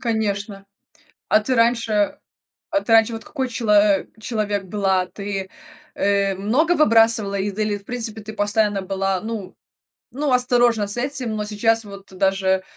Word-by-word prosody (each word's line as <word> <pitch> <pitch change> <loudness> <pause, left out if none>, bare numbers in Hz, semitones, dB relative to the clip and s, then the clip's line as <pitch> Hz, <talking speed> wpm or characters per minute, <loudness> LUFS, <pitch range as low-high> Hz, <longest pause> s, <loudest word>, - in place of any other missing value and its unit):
Конечно, 205 -3 -2 0.6
а 215 - +4
ты 255 +4 -1
раньше, 230 -1 +2
э 205 -1 +1 0.5
а 300 -3 +1
ты 230 - -1
раньше 225 +1 +5
вот 225 - -7
какой 265 -4 -3
чело 225 -3 -1
а 205 -1 +4 0.2
человек 210 -3 -2
была? 190 -1 0
Ты, 195 0 -5 0.5
э, 200 -1 +1
много 240 - +1
выбрасывала 225 - +3
из 195 0 -3
или, 210 -1 0
в 200 - -21
принципе, 225 -2 -4
ты 215 +1 -8
постоянно 205 -1 0
была, 195 0 -1
ну 215 -3 -6 0.6
ну, 290 0 -1
осторожна 245 -3 +3
с 205 - 0
этим, 255 -3 -3
но 210 - -2
сейчас 225 +2 +1
вот 200 -1 -11
даже 190 0 +1
210 Hz, 160 wpm, -21 LUFS, 200-230 Hz, 0.6 s, раньше